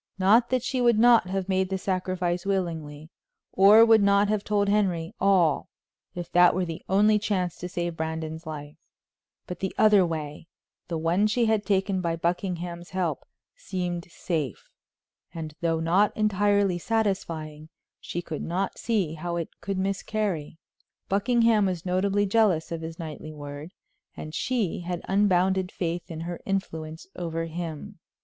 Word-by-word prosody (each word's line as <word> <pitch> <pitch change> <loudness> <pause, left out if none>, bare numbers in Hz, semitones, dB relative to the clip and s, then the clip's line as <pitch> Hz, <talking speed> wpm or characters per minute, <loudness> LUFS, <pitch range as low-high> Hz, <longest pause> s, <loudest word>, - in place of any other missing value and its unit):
Not 215 +6 +4
that 255 -2 0
she 255 0 -1
would 240 -2 +4
not 235 -3 +6
have 190 0 -2
made 190 -1 +1
the 190 - -1
sacrifice 185 -2 -2
willingly, 165 -6 -3 0.4
or 205 +4 +7
would 225 -2 +6
not 200 0 +4
have 210 -1 0
told 205 -1 +1
Henry 190 -4 0
all 180 -6 +3 0.5
if 175 -1 -6
that 175 0 +5
were 185 0 0
the 165 -2 -6
only 210 +2 +4
chance 185 -5 -1
to 180 - -6
save 175 -2 -3
Brandon's 160 0 -4
life, 150 -1 -7 0.7
but 180 - -7
the 190 - -3
other 210 -3 +6
way, 155 -2 -4 0.4
the 170 - -3
one 170 +6 +2
she 230 +3 +1
had 220 -2 +1
taken 195 -2 +1
by 170 -2 -1
Buckingham's 175 0 -3
help, 175 -6 -2 0.3
seemed 180 -3 -4
safe, 155 - -4 0.6
and, 160 -2 -6
though 165 -1 +1
not 180 +6 +2
entirely 205 -3 +2
satisfying, 165 -8 -2 0.3
she 175 - -5
could 160 -3 -5
not 185 +4 -2
see 200 -9 0
how 170 +2 -4
it 170 -2 -3
could 195 -1 -3
miscarry. 190 -4 -2 0.5
Buckingham 225 0 +3
was 180 -2 -3
notably 195 +3 +1
jealous 195 -6 +2
of 165 -1 -4
his 165 0 -7
knightly 155 -2 -7
word, 145 +2 -8 0.5
and 155 - -7
she 225 -3 -1
had 175 0 -5
unbounded 190 -1 +2
faith 170 0 -3
in 160 -1 -6
her 170 +1 -5
influence 160 -5 -4
over 165 -1 -3
him. 170 +3 -6
180 Hz, 155 wpm, -26 LUFS, 165-200 Hz, 0.7 s, or